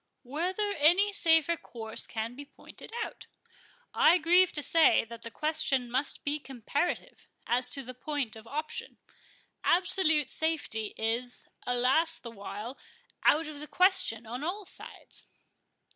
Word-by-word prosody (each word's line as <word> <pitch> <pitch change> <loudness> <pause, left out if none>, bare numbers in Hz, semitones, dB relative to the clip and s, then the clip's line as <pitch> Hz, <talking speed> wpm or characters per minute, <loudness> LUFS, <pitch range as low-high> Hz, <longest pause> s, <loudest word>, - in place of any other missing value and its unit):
"Whether 360 - -2
any 360 +8 +5
safer 330 -4 +4
course 225 -7 -6
can 225 +1 -4
be 280 +3 -8
pointed 285 - -13
out. - - -9 0.7
I 345 - +6
grieve 355 +2 +4
to 295 - +1
say, 320 -4 +4
that 230 0 -10
the 230 - -7
question 275 -3 0
must 265 +3 0
be 290 +1 0
comparative, 275 +5 -3 0.2
as 250 +1 +1
to 275 +2 -2
the 255 - -8
point 265 -2 -3
of 220 0 -12
option. 305 +5 -5 0.7
Absolute 350 -5 +3
safety 295 -9 0
is—alas 245 +6 +1
the 235 - -9
while!—out 250 - -2
of 300 -1 -7
the 300 - -7
question 365 - +2
on 245 +5 -6
all 385 +5 -3
sides. - - -8
290 Hz, 130 wpm, -30 LUFS, 240-330 Hz, 0.7 s, I